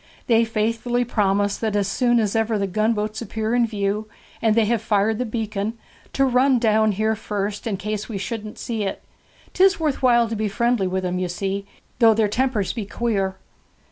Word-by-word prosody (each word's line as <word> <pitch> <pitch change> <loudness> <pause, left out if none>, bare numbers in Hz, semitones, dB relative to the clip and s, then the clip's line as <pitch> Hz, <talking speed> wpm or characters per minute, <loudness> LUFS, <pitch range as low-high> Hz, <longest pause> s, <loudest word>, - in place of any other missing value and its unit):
They 230 -1 +4
faithfully 230 +2 0
promise 205 -3 +1
that 220 -2 -2
as 200 -2 +1
soon 240 +3 +2
as 215 -1 0
ever 225 0 +1
the 200 - 0
gunboats 215 +2 -1
appear 220 0 -3
in 240 -1 +3
view, 210 0 -2 0.3
and 220 -2 +3
they 225 -1 +4
have 230 0 +1
fired 210 +1 +1
the 250 - -1
beacon, 220 -1 -3 0.4
to 275 - +3
run 260 +1 +3
down 220 -2 +3
here 220 +2 0
first, 205 0 -4
in 205 -4 -1
case 210 +3 -4
we 215 - -3
shouldn't 215 +1 -5
see 225 -2 -3
it. 195 - -3 0.5
'Tis 385 +1 +4
worth 305 -4 -1
while 240 -2 +4
to 225 - -3
be 215 0 -1
friendly 235 -1 +1
with 185 0 -2
'em, 180 0 -1
you 180 -1 -2
see, 195 +2 -3 0.3
though 225 -2 +6
their 220 -1 +2
tempers 225 -2 0
be 215 -5 -5
queer.' 200 -5 -1
220 Hz, 195 wpm, -22 LUFS, 205-235 Hz, 0.5 s, though